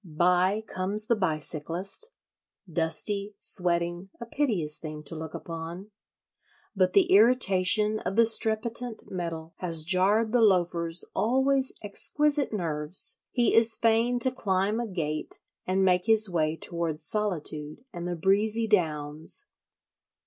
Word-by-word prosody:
By 180 Hz, +4 st, +2 dB
comes 200 Hz, +3 st, 0 dB
the 235 Hz, -, +1 dB
bicyclist: 170 Hz, -, -2 dB, 0.6 s
dusty, 190 Hz, +5 st, -1 dB
sweating, 175 Hz, -1 st, +1 dB
a 235 Hz, -, -7 dB
piteous 210 Hz, -, -1 dB
thing 155 Hz, -1 st, -8 dB
to 150 Hz, +3 st, -4 dB
look 160 Hz, 0 st, -7 dB
upon. 170 Hz, +5 st, -8 dB, 0.8 s
But 185 Hz, -2 st, +1 dB
the 195 Hz, -, +3 dB
irritation 210 Hz, -1 st, +4 dB
of 195 Hz, -, -4 dB
the 230 Hz, +1 st, +5 dB
strepitant 225 Hz, +1 st, 0 dB
metal 165 Hz, -3 st, -6 dB
has 165 Hz, -3 st, 0 dB
jarred 195 Hz, +6 st, +2 dB
the 245 Hz, 0 st, +2 dB
Loafer's 175 Hz, -4 st, +2 dB
always 265 Hz, +3 st, +1 dB
exquisite 290 Hz, +8 st, 0 dB
nerves: 165 Hz, -4 st, -1 dB
he 240 Hz, -2 st, +1 dB
is 225 Hz, 0 st, +5 dB
fain 230 Hz, +2 st, +1 dB
to 260 Hz, -, +3 dB
climb 200 Hz, -2 st, -1 dB
a 240 Hz, -, -3 dB
gate 155 Hz, -6 st, -4 dB, 0.3 s
and 190 Hz, +1 st, +1 dB
make 180 Hz, +1 st, +1 dB
his 220 Hz, -1 st, +5 dB
way 160 Hz, -3 st, -1 dB
towards 165 Hz, -2 st, -4 dB
solitude 160 Hz, -4 st, -3 dB
and 175 Hz, -1 st, -6 dB
the 175 Hz, -, -3 dB
breezy 210 Hz, +6 st, +1 dB
downs. 155 Hz, -7 st, -1 dB
190 Hz, 125 wpm, -26 LUFS, 165-220 Hz, 0.8 s, the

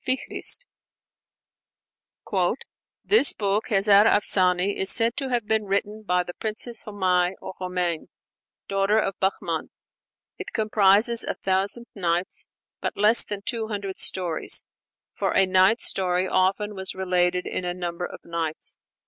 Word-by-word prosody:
Flügel, 260 Hz, 0 st, -1 dB
page -, -, +2 dB, 1.7 s
304): -, -, +1 dB, 0.5 s
"This 405 Hz, -9 st, +4 dB
book, 205 Hz, 0 st, -1 dB
'Hezar 205 Hz, -1 st, +4 dB
Afsane,' 190 Hz, -2 st, +3 dB
is 190 Hz, -, +2 dB
said 230 Hz, 0 st, +4 dB
to 270 Hz, -2 st, -4 dB
have 240 Hz, -3 st, -1 dB
been 220 Hz, 0 st, 0 dB
written 205 Hz, +2 st, -2 dB
by 180 Hz, -3 st, 0 dB
the 175 Hz, -, -8 dB
Princess 225 Hz, +3 st, -2 dB
Homai 185 Hz, -3 st, 0 dB
(or -, -, -8 dB
Homain), 180 Hz, -3 st, -3 dB, 0.6 s
daughter 195 Hz, +2 st, +1 dB
of 195 Hz, -3 st, 0 dB
Bahman. 190 Hz, +1 st, -2 dB, 0.7 s
It -, -, -7 dB
comprises 215 Hz, +2 st, +3 dB
a -, -, -3 dB
Thousand 195 Hz, +5 st, -2 dB
Nights, 175 Hz, -2 st, -2 dB, 0.3 s
but -, -, -4 dB
less 215 Hz, +3 st, +6 dB
than 205 Hz, -1 st, -7 dB
two 225 Hz, -1 st, -2 dB
hundred 200 Hz, -3 st, -5 dB
stories; 175 Hz, -4 st, +1 dB, 0.5 s
for -, -, -2 dB
a 195 Hz, -, +5 dB
night 190 Hz, +5 st, +3 dB
story 185 Hz, -1 st, +1 dB
often 195 Hz, +3 st, 0 dB
was 190 Hz, -1 st, -4 dB
related 180 Hz, -1 st, 0 dB
in -, -, -4 dB
a 175 Hz, 0 st, -3 dB
number 175 Hz, 0 st, -4 dB
of -, -, -12 dB
nights. 165 Hz, -2 st, -5 dB
195 Hz, 140 wpm, -24 LUFS, 180-215 Hz, 1.7 s, less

